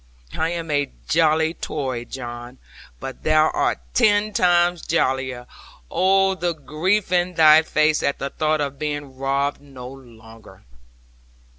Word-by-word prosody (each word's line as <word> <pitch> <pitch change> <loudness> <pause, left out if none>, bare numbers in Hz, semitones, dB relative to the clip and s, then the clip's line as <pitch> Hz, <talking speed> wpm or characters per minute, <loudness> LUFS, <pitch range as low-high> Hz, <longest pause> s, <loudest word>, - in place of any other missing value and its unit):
I 160 - 0
am 165 -2 -4
a 145 -1 0 0.2
jolly 160 0 +2
Tory, 130 -7 -4
John, 120 -1 -8 0.4
but 135 - -8
thou 155 0 +3
art - - 0 0.2
ten 205 - +3
times 175 -2 +2
jollier: 130 -5 -1 0.5
oh! 195 +1 +3
the 175 -2 -2
grief 175 +7 -1
in 180 0 +1
thy 155 -1 +7
face 155 -1 +1
at 140 - 0
the 140 - -5
thought 155 -1 0
of 140 -1 -4
being 145 -3 -4
robbed 140 +2 -1
no 135 -3 -11
longer!' 115 -4 -15
155 Hz, 135 wpm, -22 LUFS, 135-170 Hz, 0.5 s, thy